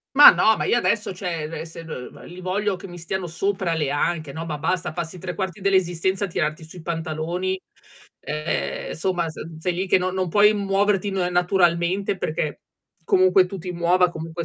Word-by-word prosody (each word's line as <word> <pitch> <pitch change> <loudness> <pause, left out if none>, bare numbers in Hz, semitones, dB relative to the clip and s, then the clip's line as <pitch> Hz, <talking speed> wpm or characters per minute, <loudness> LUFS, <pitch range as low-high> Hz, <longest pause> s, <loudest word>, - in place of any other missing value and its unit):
Ma 290 - +12
no, 220 - +4
ma - - -2
io 240 - +3
adesso, 210 -4 0
cioè 170 -5 -3
e 165 - -5
se 165 0 -10
n 125 -6 -8
li 180 +1 -10
voglio 195 +2 -1
che 180 - -10
mi 175 - -10
stiano 180 +2 -3
sopra 185 +1 -1
le 150 -4 -1
anche, 155 0 -1
no, 160 +3 -5
ma 155 - -3
basta, 165 +2 -1
passi 170 +2 -5
3/4 185 +1 -4
dell'esistenza 190 0 +1
a 195 - -2
tirarti 155 -1 -2
su 160 - -13
i 175 - -9
pantaloni, 170 +3 -2 0.6
ehm, 150 +2 -3
insomma 175 -1 -1
s 155 - -8 0.2
sei 175 +2 -1
lì 185 +2 -2
che 185 - +4
non 185 0 -2
non 185 -2 -1
puoi 210 +3 +5
muoverti 200 0 +1
na 185 -2 0
naturalmente 175 +1 +2
perché 155 -4 -3 0.4
comunque 185 +2 +5
tu 195 +1 -7
ti 180 +1 -6
muova, 175 +1 +3
comunque 165 0 -5
180 Hz, 190 wpm, -23 LUFS, 165-190 Hz, 0.6 s, Ma